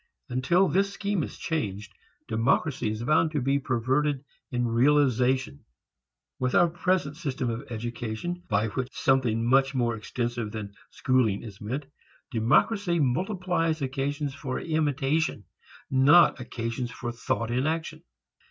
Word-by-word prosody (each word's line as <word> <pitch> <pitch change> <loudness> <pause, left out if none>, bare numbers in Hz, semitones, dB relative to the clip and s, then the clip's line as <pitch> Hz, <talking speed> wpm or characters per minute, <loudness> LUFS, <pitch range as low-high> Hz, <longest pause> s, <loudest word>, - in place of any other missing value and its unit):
Until 170 +10 +3
this 195 +5 +1
scheme 200 -2 -1
is - - -5
changed, 105 - -3 0.3
democracy 120 +3 +1
is 110 +2 -4
bound 155 +4 +3
to 150 - +1
be 135 +2 +1
perverted 135 +3 0 0.3
in 120 -1 0
realization. 130 +1 +2 0.8
With 125 0 0
our 175 -1 +5
present 175 -3 0
system 135 -7 -2
of 120 +5 -6
education 120 +8 -4
by 105 +1 +1
which 125 +4 -3
something 120 -4 +1
much 135 +2 +3
more 120 -2 +1
extensive 115 0 -3
than 105 -2 -6 0.2
schooling 125 -7 +1
is 100 -5 -10
meant 130 +7 -3 0.5
democracy 170 - +2
multiplies 165 - 0
occasions 140 +2 -2
for 135 -2 -4
imitation 155 -5 0 0.5
not 135 +7 +6
occasions 120 0 -4
for 120 +1 -5
thought 115 0 -2
in 130 +4 +1
action. 160 0 -3
130 Hz, 130 wpm, -27 LUFS, 120-155 Hz, 0.8 s, not